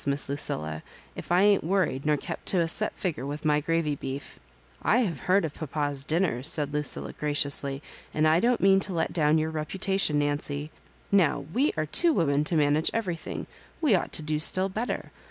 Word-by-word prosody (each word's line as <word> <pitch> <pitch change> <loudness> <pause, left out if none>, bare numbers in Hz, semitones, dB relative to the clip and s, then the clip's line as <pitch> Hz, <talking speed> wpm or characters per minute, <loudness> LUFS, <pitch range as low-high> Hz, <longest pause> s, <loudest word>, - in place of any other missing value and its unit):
Miss 140 0 0
Lucilla, 80 - -2 0.3
if - - -8
I 180 +2 +4
ain't 205 -1 +4
worried 165 -6 0
nor 150 -1 +3
kept - - -7
to 185 - +3
a 165 - +2
set 215 +6 +1
figger 165 -9 -3
with 145 +2 -5
my 150 -1 +3
gravy 160 -1 0
beef" 135 0 -7 0.2
" - - -31
I 245 - +3
have 170 - -2
heard 195 -1 +4
of 150 - -5
papa's 145 -2 -2
dinners," 155 -4 0
said 150 -2 0
Lucilla, 150 0 -2
graciously, 145 -1 0
" - - -22
and 155 +1 +2
I 160 +2 +4
don't 240 +4 +2
mean 195 0 +5
to 195 -1 -2
let 165 - -1
down 155 -2 +3
your 160 0 -1
.reputation, 160 +1 0
Nancy. 145 +1 -2 0.4
Now 180 -8 +3
we 270 +7 +2
are 155 - 0
two 335 - +2
women 150 - +2
to 165 - -1
'manage 150 +1 +3
everything, 185 -7 -3 0.3
we 300 -9 +3
ought 185 - +1
to 155 - +2
do 150 0 -1
still 185 +4 +1
better. 220 +6 -4
155 Hz, 200 wpm, -27 LUFS, 145-185 Hz, 0.4 s, mean